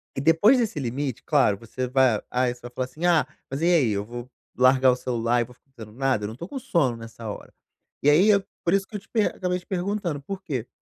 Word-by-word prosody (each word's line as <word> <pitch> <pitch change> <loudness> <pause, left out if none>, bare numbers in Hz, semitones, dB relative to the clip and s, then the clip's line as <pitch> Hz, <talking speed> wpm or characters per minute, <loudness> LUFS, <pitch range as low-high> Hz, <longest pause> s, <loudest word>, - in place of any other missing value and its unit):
e 135 - -2
depois 165 - +5
desse 220 -10 -1
limite, 130 0 -3
claro, 135 -10 +3
você 125 +3 -5
vai 130 -4 +3
ah, 125 0 +1
você 120 0 -4
vai 120 0 -9
falar 130 +1 -2
assim: 160 +7 -6
"Ah 170 -4 +4 0.2
mas, 140 +3 -3
e - - +2
aí 160 -11 +4
eu 100 0 -2
vou 120 +2 -8 0.3
largar 130 0 +5
o - - +1
celular 120 -1 0
e - - +2
vou 125 - -16
ficar 135 - -39
fazendo 110 -4 -11
nada? 135 -6 +1
Eu - - -1
não 110 - -6
estou 170 +9 -8
com 275 - -5
sono 145 - +1
nessa 115 -1 -8
hora." - - -8 0.5
E 145 - +5
aí 180 +9 +5
eu 200 -2 +4 0.2
por 170 - +1
isso 195 -1 +1
que 215 - -11
eu - - -2
te - - -25
per 220 -3 +1
acabei 180 -1 -1
te 175 - -21
perguntando, 185 -5 -2
por 195 +5 -6
que? 125 -4 -3
135 Hz, 260 wpm, -25 LUFS, 120-175 Hz, 0.5 s, depois